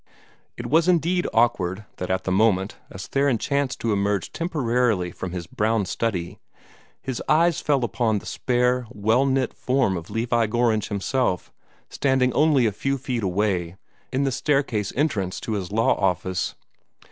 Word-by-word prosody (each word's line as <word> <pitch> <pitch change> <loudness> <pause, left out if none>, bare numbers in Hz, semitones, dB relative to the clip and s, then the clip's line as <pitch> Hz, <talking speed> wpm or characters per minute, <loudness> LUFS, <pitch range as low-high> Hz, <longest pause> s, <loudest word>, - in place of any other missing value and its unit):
It - - -6
was 160 +3 +3
indeed 175 +1 +2
awkward 110 -4 +1
that 90 - -4
at 95 0 0
the 95 - -2
moment, 95 0 +2
as 95 -1 -8
Theron 140 -3 +1
chanced 140 +2 -1
to 115 -2 +1
emerge 100 -1 0
temporarily 125 - 0
from 90 +1 -6
his 90 -2 -5
brown 105 +4 0
study, 90 -4 -3 0.6
his 130 -3 -4
eyes 165 +1 +3
fell 145 -2 +2
full - - +1
upon 110 0 0
the - - -7
spare, 125 -1 0
well 115 +4 +2
knit 130 -1 0
form 130 -7 +1
of 85 -2 -6
Levi 115 0 +1
Gorringe 115 -1 +1
himself, 100 -1 -1 0.3
standing 130 -2 +1
only 145 -4 +4
a 110 - +2
few 135 +7 -2
feet 125 -2 -3
away, 95 -3 0 0.4
in 135 +2 0
the 135 - +1
staircase 135 -7 0
entrance 105 - 0
to - - -5
his 100 -4 -3
law 110 +2 +3
office. 95 -1 -1
115 Hz, 160 wpm, -24 LUFS, 100-135 Hz, 0.6 s, only